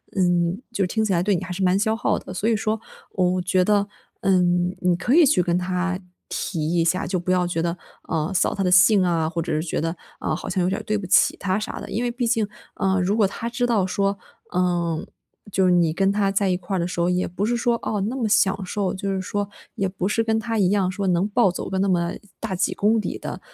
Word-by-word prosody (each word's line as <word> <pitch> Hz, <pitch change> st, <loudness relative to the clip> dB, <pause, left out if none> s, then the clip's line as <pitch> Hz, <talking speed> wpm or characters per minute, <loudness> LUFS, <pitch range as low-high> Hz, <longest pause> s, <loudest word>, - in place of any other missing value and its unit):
嗯， 175 Hz, +1 st, +1 dB
就 205 Hz, -4 st, 0 dB
是 -, -, -3 dB
听 220 Hz, +4 st, 0 dB
起 215 Hz, -, 0 dB
来 175 Hz, -2 st, +2 dB
对 200 Hz, +2 st, +2 dB
你 185 Hz, -, -3 dB
还 185 Hz, -, -7 dB
是 180 Hz, +2 st, -4 dB
蛮 185 Hz, +1 st, +3 dB
消 220 Hz, +2 st, +1 dB
耗 -, -, +1 dB
的。 -, -, -8 dB
所 205 Hz, +5 st, 0 dB
以 230 Hz, -, +3 dB
说 215 Hz, +1 st, -1 dB, 0.3 s
我 185 Hz, -1 st, +1 dB
觉 185 Hz, 0 st, +2 dB
得， 205 Hz, 0 st, +2 dB, 0.3 s
嗯， 180 Hz, -2 st, +2 dB
你 180 Hz, -1 st, +2 dB
可 180 Hz, +8 st, 0 dB
以 335 Hz, -1 st, +7 dB
去 255 Hz, -11 st, +3 dB
跟 175 Hz, 0 st, +1 dB
他 180 Hz, 0 st, -1 dB, 0.3 s
提 160 Hz, -2 st, -2 dB
一 165 Hz, -1 st, +2 dB
下， 185 Hz, +4 st, +1 dB
就 185 Hz, -1 st, -1 dB
不 175 Hz, -, -6 dB
要 180 Hz, -1 st, +2 dB
觉 175 Hz, -2 st, -1 dB
得， 170 Hz, +1 st, -1 dB, 0.3 s
呃， 160 Hz, +2 st, -2 dB
扫 185 Hz, -, +1 dB
他 195 Hz, -, -1 dB
的 180 Hz, -, +1 dB
兴 185 Hz, +2 st, +6 dB
啊， 165 Hz, -3 st, +1 dB
或 170 Hz, 0 st, -2 dB
者 -, -, -4 dB
是 155 Hz, -, +1 dB
觉 -, -, -1 dB
得， 165 Hz, +1 st, -1 dB, 0.3 s
嗯， -, -, -1 dB
好 -, -, -5 dB
像 185 Hz, -1 st, 0 dB
有 180 Hz, -, +1 dB
点 195 Hz, -, -1 dB
儿 -, -, -8 dB
对 215 Hz, -1 st, 0 dB
不 205 Hz, -, -5 dB
起 -, -, +4 dB
他 190 Hz, 0 st, -1 dB
啥 215 Hz, -, -5 dB
的。 -, -, -8 dB
因 240 Hz, +3 st, -1 dB
为 -, -, 0 dB
毕 240 Hz, +1 st, -2 dB
竟 225 Hz, -2 st, +1 dB, 0.3 s
呃， 190 Hz, -1 st, +1 dB
如 195 Hz, +4 st, +1 dB
果 210 Hz, -3 st, +4 dB
他 230 Hz, +4 st, -5 dB
知 245 Hz, +1 st, -1 dB
道 215 Hz, -6 st, +2 dB
说， 195 Hz, +1 st, 0 dB, 0.3 s
呃， 175 Hz, -3 st, 0 dB, 0.5 s
就 190 Hz, 0 st, +2 dB
是 180 Hz, -, +4 dB
你 170 Hz, -3 st, +3 dB
跟 195 Hz, +2 st, +2 dB
他 200 Hz, -1 st, +1 dB
在 195 Hz, 0 st, +1 dB
一 180 Hz, -, +1 dB
块 185 Hz, +2 st, -4 dB
儿 -, -, 0 dB
的 170 Hz, -, 0 dB
时 175 Hz, 0 st, -4 dB
候 170 Hz, +1 st, +2 dB
也 180 Hz, 0 st, +1 dB
不 185 Hz, +4 st, -3 dB
是 240 Hz, +2 st, +1 dB
说， 235 Hz, 0 st, +1 dB
哦， 210 Hz, -2 st, -2 dB
那 225 Hz, +7 st, -2 dB
么 235 Hz, -4 st, 0 dB
享 200 Hz, -3 st, +2 dB
受。 195 Hz, 0 st, -2 dB
就 195 Hz, 0 st, -3 dB
是 190 Hz, -, -2 dB
说 205 Hz, +2 st, -2 dB, 0.3 s
也 195 Hz, -, 0 dB
不 185 Hz, -1 st, -4 dB
是 225 Hz, -, +1 dB
跟 225 Hz, -1 st, +1 dB
他 225 Hz, 0 st, -2 dB
一 185 Hz, -3 st, +3 dB
样 195 Hz, -3 st, +2 dB
说 200 Hz, +1 st, -3 dB
能 180 Hz, +1 st, +2 dB
暴 220 Hz, -1 st, +3 dB
走 180 Hz, -, -5 dB
个 190 Hz, -, -1 dB
那 195 Hz, -, +2 dB
么 175 Hz, -2 st, +1 dB, 0.3 s
大 225 Hz, -4 st, -3 dB
几 180 Hz, -, 0 dB
公 220 Hz, +2 st, +2 dB
里 -, -, -3 dB
的， -, -, -6 dB
190 Hz, 290 characters per minute, -23 LUFS, 180-205 Hz, 0.5 s, 以